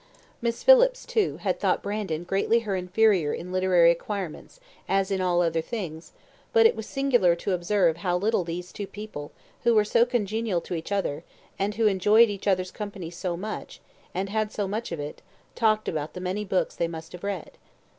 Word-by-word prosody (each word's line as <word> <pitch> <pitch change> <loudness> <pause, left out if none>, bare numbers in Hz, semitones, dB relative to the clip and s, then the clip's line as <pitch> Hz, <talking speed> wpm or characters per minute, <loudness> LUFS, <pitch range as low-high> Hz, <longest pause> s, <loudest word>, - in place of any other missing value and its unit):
Miss 235 0 -2
Phillips, - - +6
too, 435 -3 0
had - - -1
thought - - +1
Brandon 200 -6 -3
greatly 195 +6 +1
her 205 -4 -2
inferior 185 -3 +2
in 180 +2 -7
literary 185 -2 +5
acquirements, 190 - -5 0.3
as 195 0 +1
in 190 -1 0
all 175 -1 +2
other 165 -1 +1
things; 170 -6 -6 0.4
but 455 -1 +6
it 450 - +5
was 220 - -6
singular 245 -11 +3
to 185 +3 -3
observe 180 -2 +2
how 180 0 0
little 200 0 +1
these 175 +1 -6
two 200 - -5
people, 205 -9 -8 0.3
who 235 -1 +3
were 210 -1 +4
so 230 +2 +4
congenial 225 -5 -1
to - - -7
each 165 +3 -5
other, 170 -6 -1 0.4
and 205 +1 -1
who 225 - +1
enjoyed 210 +3 +5
each 200 0 -6
other's 185 -2 +1
company 200 -5 -6
so 175 0 -3
much, 215 +4 -6 0.3
and 190 +2 -3
had 215 +1 -1
so 205 -2 -2
much 215 +3 -4
of 170 - -4
it, 145 +1 -6 0.3
talked 215 -2 +2
about 155 -1 -3
the - - -6
many 185 +3 -2
books 190 -2 -1
they 170 - 0
must 165 -1 -8
have 180 - -10
read. 200 -5 -4
195 Hz, 195 wpm, -26 LUFS, 175-215 Hz, 0.4 s, Phillips